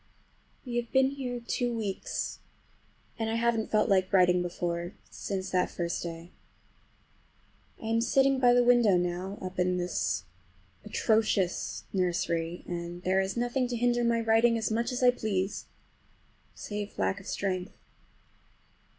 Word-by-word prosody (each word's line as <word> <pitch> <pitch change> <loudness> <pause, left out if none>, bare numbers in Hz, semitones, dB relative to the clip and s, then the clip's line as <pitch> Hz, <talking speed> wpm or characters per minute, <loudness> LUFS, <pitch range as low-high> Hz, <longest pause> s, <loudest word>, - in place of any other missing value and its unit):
We 240 -1 -3
have 240 -1 -2
been 265 0 +4
here 255 -3 -4
two 240 0 -2
weeks, 200 -3 -3 0.8
and 225 -1 -1
I 225 - -1
haven't 230 -1 +1
felt 215 - +3
like 190 -3 +2
writing 180 -2 +5
before, 175 0 -3 0.2
since 190 -1 -4
that 180 -1 +2
first 170 -1 -3
day. 170 0 -7 1.5
I - - -9
am 225 +1 +1
sitting 270 +3 +3
by 245 -1 +5
the 245 - +5
window 240 -6 +5
now, 180 +3 -2
up 185 0 -6
in 180 0 +2
this 135 - -1 0.6
atrocious 215 -5 0
nursery, 175 -2 -1
and 175 0 -5
there 190 +1 +2
is 190 +4 -3
nothing 245 +2 0
to 245 - -3
hinder 240 0 +2
my 235 0 +2
writing 225 +1 +4
as 220 -1 -1
much 235 +3 0
as 250 0 -2
I 250 - +7
please, 205 -4 -2 0.9
save 205 0 -6
lack 195 - 0
of 195 - -13
strength. 185 -1 -3
205 Hz, 145 wpm, -29 LUFS, 180-235 Hz, 1.5 s, I